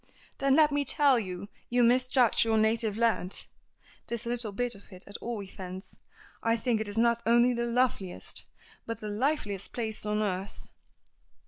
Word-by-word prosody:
"Then 275 Hz, 0 st, +3 dB
let 305 Hz, -1 st, +5 dB
me 285 Hz, 0 st, +1 dB
tell 280 Hz, -2 st, +4 dB
you 185 Hz, -2 st, -5 dB, 0.2 s
you 245 Hz, 0 st, +3 dB
misjudge 250 Hz, 0 st, +4 dB
your 225 Hz, -1 st, +1 dB
native 220 Hz, -1 st, +1 dB
land; 225 Hz, -5 st, 0 dB, 0.6 s
this 235 Hz, 0 st, -3 dB
little 235 Hz, -2 st, -1 dB
bit 245 Hz, +4 st, +1 dB
of 200 Hz, 0 st, -16 dB
it, 185 Hz, -1 st, -9 dB
at 200 Hz, -, -12 dB
all 230 Hz, -4 st, -5 dB
events. 185 Hz, 0 st, -9 dB, 0.5 s
I 230 Hz, 0 st, +2 dB
think 230 Hz, -2 st, 0 dB
it 205 Hz, 0 st, -3 dB
not 235 Hz, 0 st, +3 dB
only 240 Hz, +2 st, +4 dB
the 235 Hz, 0 st, -1 dB
loveliest, 235 Hz, -6 st, 0 dB, 0.4 s
but 230 Hz, -, -4 dB
the 210 Hz, -, -5 dB
liveliest 210 Hz, -4 st, -1 dB
place 220 Hz, -3 st, -3 dB
on 210 Hz, 0 st, 0 dB
earth." 190 Hz, -1 st, -4 dB
230 Hz, 160 wpm, -29 LUFS, 205-245 Hz, 0.6 s, let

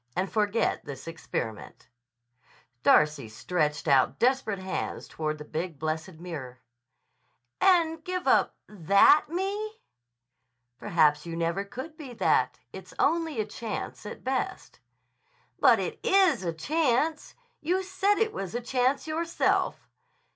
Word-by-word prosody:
And 185 Hz, +1 st, -1 dB
forget 210 Hz, +1 st, 0 dB
this 140 Hz, 0 st, -9 dB
experiment." 115 Hz, -9 st, -6 dB, 0.9 s
Darcy 150 Hz, -5 st, +3 dB
stretched 150 Hz, +6 st, -2 dB
out 135 Hz, -3 st, +3 dB
desperate 250 Hz, -4 st, +1 dB
hands 190 Hz, 0 st, -4 dB
toward 155 Hz, -1 st, -3 dB
the 150 Hz, -, -9 dB
big, 160 Hz, +1 st, -4 dB
blessed 160 Hz, +4 st, -3 dB
mirror. 155 Hz, -7 st, -8 dB, 1.0 s
"And 330 Hz, -4 st, +3 dB
give 365 Hz, +1 st, -3 dB
up -, -, +3 dB
that 200 Hz, -, +5 dB
Me?" 405 Hz, +5 st, -3 dB, 1.0 s
"Perhaps 155 Hz, -5 st, +2 dB
you 165 Hz, -, -5 dB
never 170 Hz, +4 st, -1 dB
could 260 Hz, +10 st, -8 dB
be 275 Hz, -6 st, -9 dB
that. 160 Hz, -, +1 dB, 0.2 s
It's 185 Hz, -1 st, -10 dB
only 320 Hz, -4 st, +1 dB
a 215 Hz, -, 0 dB
chance 215 Hz, +1 st, -6 dB
at -, -, -9 dB
best." 260 Hz, 0 st, -3 dB, 0.8 s
"But -, -, +6 dB
it -, -, -4 dB
is 370 Hz, -, +3 dB
a 170 Hz, -, -1 dB
chance. 300 Hz, -, 0 dB, 0.2 s
You 365 Hz, +4 st, 0 dB
said 390 Hz, +2 st, +1 dB
it 440 Hz, 0 st, +1 dB
was 195 Hz, +2 st, -5 dB
a 240 Hz, -, -1 dB
chance 255 Hz, +3 st, 0 dB
yourself." 330 Hz, +2 st, 0 dB
210 Hz, 125 wpm, -27 LUFS, -, 1.0 s, But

